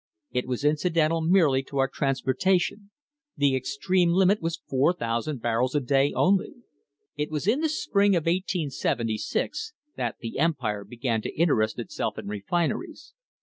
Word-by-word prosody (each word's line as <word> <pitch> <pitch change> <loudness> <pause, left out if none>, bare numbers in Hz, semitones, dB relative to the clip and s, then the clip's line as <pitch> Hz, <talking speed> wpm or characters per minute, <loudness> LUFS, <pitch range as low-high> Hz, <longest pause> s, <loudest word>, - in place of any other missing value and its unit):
It 125 - -2
was 130 +2 -2
incidental 160 +1 +2
merely 160 -6 +4
to 140 - -7
our 135 0 +3
transportation. 175 +10 0 0.5
The 140 -2 +3
extreme 170 +7 +1
limit 190 +3 +3
was 165 0 -3
4,000 130 -2 0
barrels 120 +3 0
a - - +4
day 135 +1 +2
only." 190 0 +1 0.6
It 150 0 -2
was 155 0 -3
in 225 +8 +2
the 320 0 +1
spring 200 -9 +2
of 170 - +2
1876 165 - -1 0.2
that - - -2
the 115 +2 -5
Empire 125 -11 0
began 120 -1 -2
to - - -6
interest 110 -10 +2
itself 120 -5 -4
in - - -6
refineries. 175 - -3
150 Hz, 145 wpm, -26 LUFS, 125-180 Hz, 0.6 s, merely